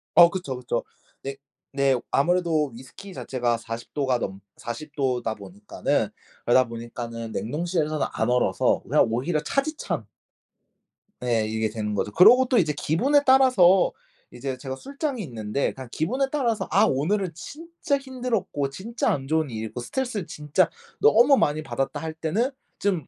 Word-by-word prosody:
어 170 Hz, 0 st, +9 dB
그쵸, 170 Hz, -8 st, -4 dB
그쵸. 125 Hz, -, -2 dB, 0.4 s
네. 135 Hz, 0 st, -4 dB, 0.4 s
네. 135 Hz, -1 st, +3 dB, 0.2 s
아무래도 165 Hz, -2 st, +2 dB
위스키 180 Hz, +11 st, -11 dB
자체가 120 Hz, -6 st, -1 dB
40 115 Hz, 0 st, -8 dB
도가 130 Hz, -4 st, +1 dB
넘 95 Hz, -2 st, -4 dB, 0.2 s
40 140 Hz, +6 st, -7 dB
도다 125 Hz, -5 st, -1 dB
보니까는 100 Hz, +1 st, -2 dB, 0.4 s
그러다 125 Hz, +1 st, +4 dB
보니까는 115 Hz, -1 st, -6 dB
냉동실에서는 155 Hz, -, -1 dB
안 -, -, 0 dB
얼어서 125 Hz, 0 st, +2 dB
그냥 -, -, +3 dB
오히려 145 Hz, +8 st, 0 dB
차디찬 300 Hz, -, -2 dB, 1.2 s
예 115 Hz, -3 st, +1 dB
이게 110 Hz, 0 st, -1 dB
되는 105 Hz, -1 st, -3 dB
거죠. 105 Hz, -, -1 dB
그러고 250 Hz, -, +7 dB
또 250 Hz, -1 st, +1 dB
이제 155 Hz, -5 st, +3 dB
기분에 265 Hz, -, +2 dB
따라서 250 Hz, -9 st, +5 dB, 0.4 s
이제 135 Hz, -2 st, -4 dB
제가 130 Hz, 0 st, -5 dB
술장이 275 Hz, -, -4 dB
있는데 115 Hz, -1 st, -2 dB
그냥 130 Hz, -3 st, -9 dB
기분에 255 Hz, -, 0 dB
따라서 240 Hz, -7 st, 0 dB
아 -, -, +5 dB
오늘은 180 Hz, +7 st, 0 dB
진짜 310 Hz, -, -4 dB
힘들었고 245 Hz, -, -2 dB
진짜 220 Hz, -, -2 dB
안 135 Hz, -1 st, -1 dB
좋은 160 Hz, -2 st, +1 dB
일이 110 Hz, -1 st, -4 dB
있고 120 Hz, -, -7 dB
스트레스를 225 Hz, -, -3 dB
진짜 150 Hz, +5 st, +1 dB, 0.3 s
너무 275 Hz, -, +6 dB
많이 150 Hz, +1 st, +1 dB
받았다 135 Hz, -3 st, -2 dB
할 160 Hz, -1 st, -5 dB
때는 195 Hz, -, -1 dB, 0.3 s
좀 185 Hz, -8 st, -1 dB
150 Hz, 325 characters per minute, -25 LUFS, 120-205 Hz, 1.2 s, 어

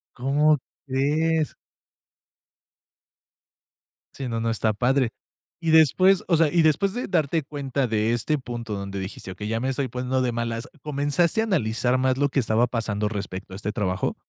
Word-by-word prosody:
¿Cómo 145 Hz, +4 st, +3 dB, 0.3 s
crees? 150 Hz, +4 st, +1 dB, 2.6 s
Sí, 135 Hz, -2 st, -5 dB
no, 115 Hz, -1 st, -2 dB
no 115 Hz, -, 0 dB
está 110 Hz, -1 st, +1 dB
padre. 125 Hz, +2 st, +1 dB, 0.5 s
Y 165 Hz, -1 st, -1 dB
después, 180 Hz, +5 st, +5 dB
o 170 Hz, -, +3 dB
sea, 160 Hz, -1 st, +4 dB
y 170 Hz, +1 st, +3 dB
después, 190 Hz, +6 st, +2 dB
de 245 Hz, -, -3 dB
darte 160 Hz, -3 st, +1 dB
cuenta 140 Hz, -2 st, -2 dB
de 110 Hz, 0 st, +1 dB
este 130 Hz, +6 st, 0 dB
punto, 120 Hz, -3 st, -5 dB
donde 100 Hz, 0 st, -5 dB
dijiste: 95 Hz, 0 st, -6 dB
"Okey, 105 Hz, -, -6 dB
ya 115 Hz, +1 st, -1 dB
me 130 Hz, -, -1 dB
estoy 135 Hz, 0 st, -1 dB
poniendo 125 Hz, +2 st, -1 dB
de 125 Hz, -1 st, 0 dB
malas", 115 Hz, +2 st, -3 dB
¿comenzaste 150 Hz, +7 st, +1 dB
a -, -, +1 dB
analizar 125 Hz, -, +1 dB
más 130 Hz, 0 st, +2 dB
lo 145 Hz, 0 st, +2 dB
que 135 Hz, -, +2 dB
estaba 115 Hz, +1 st, +2 dB
pasando, 110 Hz, -3 st, -2 dB
respecto 100 Hz, -3 st, -6 dB
a 95 Hz, -, -6 dB
este 105 Hz, +1 st, -3 dB
trabajo? 95 Hz, -4 st, -1 dB
130 Hz, 170 wpm, -24 LUFS, 115-150 Hz, 2.6 s, después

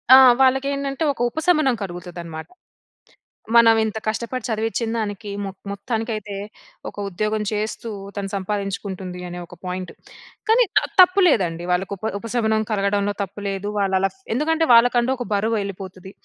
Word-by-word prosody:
ఆ! -, -, +11 dB, 0.2 s
వాళ్ళకేంటంటే, 275 Hz, +2 st, +1 dB
ఒక 245 Hz, -, -8 dB
ఉపశమనం 310 Hz, -2 st, +2 dB
కలుగుతదనమాట. 175 Hz, -3 st, -6 dB, 1.1 s
మనం 230 Hz, -1 st, +7 dB
ఇంత 220 Hz, 0 st, -2 dB
కష్టపడి 235 Hz, +3 st, -2 dB
చదివించిన 225 Hz, 0 st, -1 dB
దానికి 205 Hz, 0 st, -4 dB
మొ 195 Hz, -, -3 dB, 0.2 s
మొత్తానికైతే 215 Hz, -1 st, -3 dB, 0.5 s
ఒక -, -, -17 dB
ఉద్యోగం 215 Hz, +3 st, -1 dB
చేస్తూ 215 Hz, +2 st, -3 dB, 0.3 s
తను 200 Hz, -1 st, -3 dB
సంపాదించుకుంటుంది 195 Hz, -2 st, -4 dB
అనే 175 Hz, 0 st, -6 dB
ఒక -, -, -13 dB
పాయింట్. 180 Hz, 0 st, -4 dB, 0.6 s
కానీ, 455 Hz, +3 st, +5 dB
త -, -, +9 dB, 0.2 s
తప్పు 365 Hz, +2 st, +6 dB
లేదండి 175 Hz, -, +1 dB
వాళ్ళకి 180 Hz, +2 st, 0 dB
ఉప 195 Hz, -, -22 dB, 0.2 s
ఉపశమనం 220 Hz, -1 st, 0 dB
కలగడంలో 200 Hz, 0 st, +1 dB
తప్పు 195 Hz, +2 st, -8 dB
లేదు. 195 Hz, 0 st, -3 dB
వాళ్ళలా 195 Hz, -1 st, +2 dB, 0.2 s
ఎందుకంటే, 320 Hz, +6 st, +1 dB
వాళ్ళకంటూ 240 Hz, +1 st, +5 dB
ఒక 245 Hz, -, -4 dB
బరువు 220 Hz, +3 st, +1 dB
ఎళ్ళిపోతది. 190 Hz, -1 st, -8 dB
215 Hz, 135 wpm, -22 LUFS, 195-240 Hz, 1.1 s, ఆ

